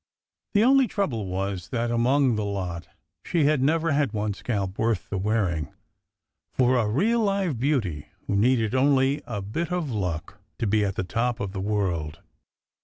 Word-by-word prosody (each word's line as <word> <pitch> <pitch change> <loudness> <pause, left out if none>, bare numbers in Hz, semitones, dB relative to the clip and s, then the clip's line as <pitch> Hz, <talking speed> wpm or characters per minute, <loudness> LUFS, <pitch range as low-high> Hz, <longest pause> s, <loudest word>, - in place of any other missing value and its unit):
The 205 - +5
only 265 +1 +5
trouble 130 - -2
was, 95 -1 -3
that 120 -2 -1
among 125 +2 +3
the 105 - -1
lot, 90 -4 -4 0.4
she 170 -3 +1
had 145 -1 +3
never 160 +3 +2
had 145 -3 +1
one 105 -1 -1
scalp 100 -3 -3
worth 110 -3 0
the 100 - -1
wearing, 95 -7 0 0.8
for 130 0 +3
a 115 -4 +2
real 205 - +2
live 195 - 0
beauty, 115 - -1 0.2
who 100 - -1
needed 115 +1 +2
only 135 +1 +3
a 105 -4 -4
bit 160 - -3
of 175 -6 -1
luck 90 -2 -3 0.2
to 115 - -2
be 105 0 +2
at 100 -1 -1
the - - -1
top 120 +6 -1
of 100 -5 -3
the 95 -1 -4
world. 95 -7 -1
115 Hz, 175 wpm, -25 LUFS, 100-140 Hz, 0.8 s, The